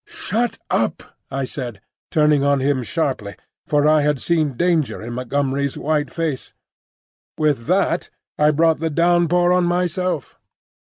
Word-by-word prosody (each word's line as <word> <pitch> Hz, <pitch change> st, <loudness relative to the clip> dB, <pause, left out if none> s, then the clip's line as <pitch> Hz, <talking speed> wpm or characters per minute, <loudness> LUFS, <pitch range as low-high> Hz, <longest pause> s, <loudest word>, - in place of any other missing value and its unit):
"Shut 235 Hz, +3 st, -2 dB
up!" -, -, 0 dB, 0.3 s
I 135 Hz, 0 st, -2 dB
said, 125 Hz, -6 st, -6 dB, 0.3 s
turning 150 Hz, -2 st, +3 dB
on 140 Hz, -1 st, +3 dB
him 135 Hz, 0 st, +1 dB
sharply, 125 Hz, -, -2 dB, 0.3 s
for 145 Hz, 0 st, +2 dB
I 155 Hz, 0 st, +5 dB
had 150 Hz, -2 st, +1 dB
seen 155 Hz, -6 st, 0 dB
danger 170 Hz, -4 st, +1 dB
in 120 Hz, +2 st, -6 dB
Montgomery's 135 Hz, +2 st, -1 dB
white 150 Hz, -2 st, 0 dB
face. 160 Hz, -4 st, -4 dB, 0.8 s
With 150 Hz, -6 st, 0 dB
that 180 Hz, -1 st, +1 dB, 0.3 s
I 150 Hz, 0 st, +3 dB
brought 160 Hz, +1 st, +3 dB
the 165 Hz, +1 st, -1 dB
downpour 175 Hz, +2 st, +3 dB
on 180 Hz, -1 st, +3 dB
myself. 175 Hz, -3 st, -1 dB
150 Hz, 140 wpm, -20 LUFS, 135-170 Hz, 0.8 s, I